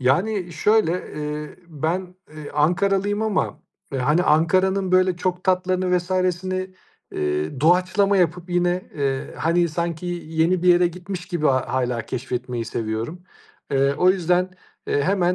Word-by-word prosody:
Yani, 175 +8 +1
şöyle, 205 +1 +3 0.2
eee, 150 0 -5
ben, 175 +4 -3 0.2
eee, 155 -1 -9
Ankaralıyım 195 +6 +1
ama, 215 -3 -1 0.3
eee, 135 - -1
hani, 150 +7 +2
Ankara'nın, 185 +4 +2
böyle, 185 -1 +4
çok 180 0 -2
tatlarını 185 -1 +2
vs.'ni, 185 +1 -1 0.4
eee, 75 - -2
doğaçlama 185 +5 +3
yapıp 180 0 0
yine, 175 +1 0
eee, 135 -2 -2
hani, 170 +2 +2
sanki 170 +1 -3 0.2
yeni 165 +3 +1
bir 180 - +3
yere 175 0 +6
gitmiş 180 +1 -6
gibi 170 -5 -1
hâ 130 -2 +2
hâlâ 125 -2 0
keşfetmeyi 125 -1 -4
seviyorum. 115 +10 -4 0.5
Eee, 140 0 +2
o 180 +1 +5
yüzden, 180 0 +1 0.4
eee, 145 - +1
hemen 180 +1 +2
175 Hz, 135 wpm, -22 LUFS, 150-185 Hz, 0.5 s, yere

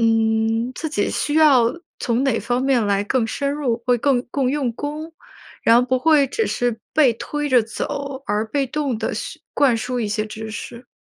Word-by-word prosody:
嗯， 225 +1 +2
自 320 - -4
己 250 -9 -1
需 295 - -2
要 285 -7 +6 0.3
从 240 +3 0
哪 240 -5 +1
方 245 +4 -1
面 260 -5 +2
来 200 0 +1
更 240 +1 +1
深 280 +5 -2
入， 250 -6 -1
会 245 -1 +3
更 255 -1 +2
更 270 -3 0
用 270 -4 -1
功， 300 +5 -6 0.5
然 230 - +6
后 245 - +5
不 255 +1 +1
会 300 -1 +4
只 445 - -1
是 240 -2 -1
被 285 -6 +5
推 295 +6 -4
着 250 -3 +5
走， 275 +4 -5
而 210 +2 0
被 275 +3 -1
动 280 -3 -2
地 220 - -2
学 - - -6
灌 265 -5 +3
输 245 +2 -3
一 215 - -1
些 215 +1 -1
知 220 +1 -7
识。 235 +3 -8
245 Hz, 215 characters per minute, -21 LUFS, 225-280 Hz, 0.5 s, 要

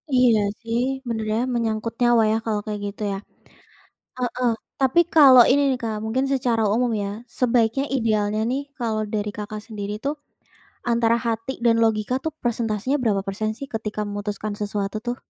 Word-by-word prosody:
Iya 245 -3 +5 0.2
sih, 230 0 -1 0.3
bener 220 -2 -2
ya 220 - +1 0.2
menyangkut 225 -1 -1
nyawa 240 -2 +5
ya 220 - +2
kalau 215 -2 -1
kayak 210 -1 -4
gitu 200 +1 -8
ya. 195 - -2 1.0
Heeh. 250 -1 0 0.3
Tapi 265 +5 +4
kalo 275 -5 +8
ini 285 +2 +4
nih, 260 - 0
Kak, 220 -2 -2
mungkin 245 +5 0
secara 245 -4 +1
umum 240 +1 +1
ya 200 - -2 0.3
sebaiknya 245 +1 +2
idealnya 215 -3 +1
nih 265 +2 0 0.2
kalau 220 -3 -1
dari 210 0 -1
Kakak 210 0 -5
sendiri 205 -3 -5
tuh, 285 +2 0 0.8
antara 230 0 +3
hati 230 +2 -2
dan 230 -1 +5
logika 220 +2 0
tuh 320 - -1
presentasenya 235 +2 0
berapa 205 -5 +1
persen 210 +3 -2
sih 275 - -6
ketika 215 -1 -3
memutuskan 205 +1 -4
sesuatu 205 0 -2
tuh? 240 0 -1
225 Hz, 165 wpm, -23 LUFS, 215-245 Hz, 1.0 s, kalo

